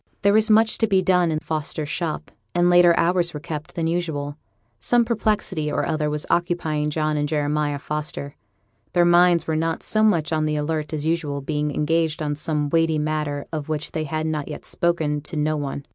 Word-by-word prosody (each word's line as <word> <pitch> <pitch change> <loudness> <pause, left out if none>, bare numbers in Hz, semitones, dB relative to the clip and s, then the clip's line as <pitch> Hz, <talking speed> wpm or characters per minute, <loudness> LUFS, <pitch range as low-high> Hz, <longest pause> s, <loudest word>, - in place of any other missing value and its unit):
There 200 0 +4
was 220 +1 +3
much 220 +1 +4
to 225 - +3
be 190 -2 +2
done 180 -2 +3
in 155 - 0
Fosters' 155 -1 -4
shop, 160 -1 -3 0.2
and 175 0 +4
later 175 -1 +6
hours 175 -1 +2
were - - -4
kept 150 0 -7
than 165 - -1
usual. 160 -4 -2 0.4
Some 240 -1 +2
perplexity 205 -8 -1
or - - 0
other 155 -2 -1
was 150 0 -2
occupying 160 -3 0
John 155 0 0
and 145 0 -1
Jeremiah 150 -1 0
Foster; 150 -1 -5 0.6
their 175 -1 +4
minds 175 0 +5
were 160 - -1
not 165 +1 -1
so 215 - +1
much 170 -8 +2
on 155 -1 +1
the 150 0 0
alert 150 0 -2
as 155 -1 -3
usual, 160 -3 -1
being 150 +1 -2
engaged 160 +2 0
on 145 -1 -1
some 150 0 -2
weighty 165 -1 +2
matter 150 -1 -2
of 155 -1 -4
which 155 0 -3
they 155 -1 -2
had 155 +2 -2
as 155 -2 -1
yet 150 - -7
spoken 160 -4 0
to 150 +3 -8
no 155 +1 +1
one. 140 -1 -4
155 Hz, 200 wpm, -23 LUFS, 150-175 Hz, 0.6 s, later